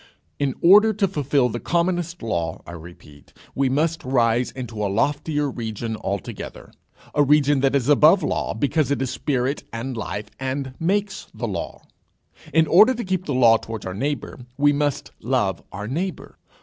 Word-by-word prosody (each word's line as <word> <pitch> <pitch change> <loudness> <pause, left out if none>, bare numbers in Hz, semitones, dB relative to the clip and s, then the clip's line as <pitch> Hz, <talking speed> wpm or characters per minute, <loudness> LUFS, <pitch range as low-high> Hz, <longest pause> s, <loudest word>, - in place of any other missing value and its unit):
In 140 -2 0
order 210 +5 +7
to 200 -1 +1
fulfil 145 -6 +1
the 120 - -4
commonest 175 -1 -1
law, 85 -7 -3
I - - -9
repeat, 80 -4 -13 0.2
we 135 -1 +1
must 155 +4 0
rise 120 -2 +2
into 115 -5 -6
a 100 - 0
loftier 145 +6 0
region 115 -3 -4
altogether, 100 -4 -6 0.4
a 145 - +3
region 145 0 +4
that 135 +1 +2
is 135 -3 +1
above 155 +6 +5
law, - - -1
because 150 +1 0
it 140 - 0
is 130 -1 -2
spirit 130 0 -1
and 120 +3 -5
life 105 -1 -5
and 135 0 -3
makes 200 +4 -1
the - - -3
law: - - -5 0.7
in 160 +2 +4
order 215 +11 +6
to 240 - -4
keep 185 -1 -2
the 145 - -2
law 115 -3 +6
towards 110 -2 -7
our 95 - -4
neighbour, 140 +6 -3 0.2
we 145 0 +4
must 145 -1 -1
love - - 0
our 105 +2 -6
neighbour. 175 - -4
135 Hz, 170 wpm, -22 LUFS, 115-155 Hz, 0.7 s, order